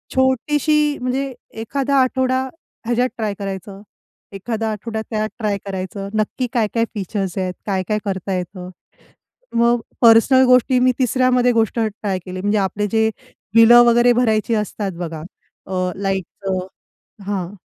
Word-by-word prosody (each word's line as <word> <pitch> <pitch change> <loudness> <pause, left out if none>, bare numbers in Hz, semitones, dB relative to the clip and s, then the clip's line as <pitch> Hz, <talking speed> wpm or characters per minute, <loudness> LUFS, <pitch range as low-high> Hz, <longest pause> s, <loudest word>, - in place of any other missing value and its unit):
छोटीशी 295 +3 +2
म्हणजे 265 +2 -2 0.3
एखादा 275 +4 -1
आठवडा 260 0 +1 0.4
ह्याच्यात 240 +2 +1
ट्राय 215 -3 -2
करायचं, 195 0 -6 0.5
एखादा 220 +3 -3
आठवडा 220 +1 -4
त्यात 215 -1 -1
ट्राय 210 -3 0
करायचं 195 +1 -5
नक्की 215 +4 -1
काय-काय 230 -1 +1
फीचर्स 195 -2 -3
आहेत, 185 -1 -1
काय-काय 200 +1 -1
करता 195 -1 -3
येतं? 180 0 -6 0.9
मग 235 +1 +3 0.2
पर्सनल 240 +3 +6
गोष्टी 250 0 +4
मी 255 +1 +4
तिसऱ्यामध्ये 250 0 +3
गोष्ट 225 -1 +1
ट्राय 210 -3 -2
केली 185 0 -6
म्हणजे, 205 +2 +1
आपले 205 +2 -1
जे 220 -1 +3 0.5
बिलं 235 +1 +8
वगैरे 240 +1 +5
भरायची 230 -2 +1
असतात 210 -1 -3
बघा. 165 -3 -5 0.5
अ, 185 -1 -1
लाईटचं 190 -1 -3 0.6
हां. 195 -2 -3
220 Hz, 130 wpm, -20 LUFS, 195-250 Hz, 0.9 s, बिलं